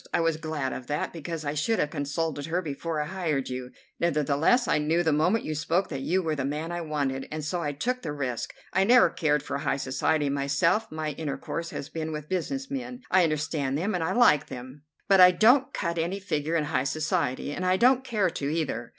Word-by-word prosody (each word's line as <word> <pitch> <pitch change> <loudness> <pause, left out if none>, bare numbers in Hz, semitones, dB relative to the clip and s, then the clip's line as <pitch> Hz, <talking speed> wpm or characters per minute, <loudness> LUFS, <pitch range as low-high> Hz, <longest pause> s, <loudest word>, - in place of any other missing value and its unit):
I - - +1
was 165 -1 +1
glad 155 -4 -3
of 125 - -7
that, 150 0 -2
because 165 -1 -5
I 145 - -1
should 185 +10 0
have 150 - 0
consulted 145 0 -2
her 175 +3 -1
before 155 +1 -3
I 150 - -1
hired 155 -6 -2
you. 125 0 -5 0.3
Nevertheless, 160 - +2
I - - +2
knew 160 +3 +1
the 160 -3 +2
moment 180 +9 +2
you 155 - -2
spoke 170 +5 0
that 135 - -4
you 185 +6 +1
were 160 -2 0
the 140 -3 -2
man 150 +4 -3
I 175 0 -3
wanted, 140 -4 -2
and 155 -1 -4
so 175 +3 -2
I 145 -3 -1
took 250 - -2
the 150 - -4
risk. 130 -5 -3 0.2
I 190 +1 +3
never 245 +5 +6
cared 150 -4 +1
for 140 - -3
high 140 - 0
society 140 +3 0
myself; 140 +9 +1
my 155 -1 -3
intercourse 160 +3 -4
has 140 - -6
been 160 0 -4
with 150 -1 -6
business 265 +10 -2
men. 255 -2 -5
I 185 - +6
understand 155 -3 -1
them, 195 +7 -1
and 175 - -1
I 160 - 0
like 240 - +5
them; 130 +3 -9 0.3
but 195 -1 +5
I 180 - +10
don't 245 +9 +4
cut 170 -7 -2
any 175 +5 -1
figure 160 -5 -2
in 160 - +2
high 145 -3 -1
society, 155 -2 -1
and 180 - -4
I 185 0 +3
don't 255 +4 +4
care 215 -8 0
to, 140 - -3
either. 150 -7 -2
155 Hz, 225 wpm, -27 LUFS, 145-180 Hz, 0.3 s, I